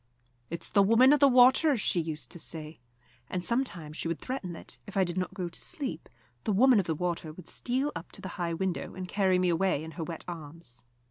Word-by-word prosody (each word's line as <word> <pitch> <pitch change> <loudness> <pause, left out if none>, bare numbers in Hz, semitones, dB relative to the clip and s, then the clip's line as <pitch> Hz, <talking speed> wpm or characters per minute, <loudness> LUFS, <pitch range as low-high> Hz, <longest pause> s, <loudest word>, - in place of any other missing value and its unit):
"It's 170 - -5
the 200 - +4
Woman 230 +7 +6
of 295 - +4
the 280 - +7
Water," 260 +3 +6
she 185 -4 +1
used 155 -1 -5
to 175 - -7
say; 155 -2 -4 0.5
and 180 -1 -3
sometimes 190 - -1
she - - -2
would 165 -1 -1
threaten 255 -9 -4
that, 165 - -9
if 200 - -6
I 190 - +5
did 175 -1 -2
not 185 +1 -2
go 185 -3 -2
to 170 - -3
sleep, 275 - -3 0.3
the - - 0
Woman 245 +3 +6
of 185 - -1
the 160 - 0
Water 170 -1 -2
would 165 +2 -12
steal 265 +4 -1
up - - -7
to 195 - -6
the 190 - -6
high 170 -3 -2
window 185 +1 -3
and 185 -1 -5
carry 190 -1 +2
me 180 0 +2
away 170 -2 +1
in 160 - -7
her 165 - -5
wet 165 0 -6
arms. 160 -6 -8
180 Hz, 230 wpm, -29 LUFS, 165-225 Hz, 0.5 s, the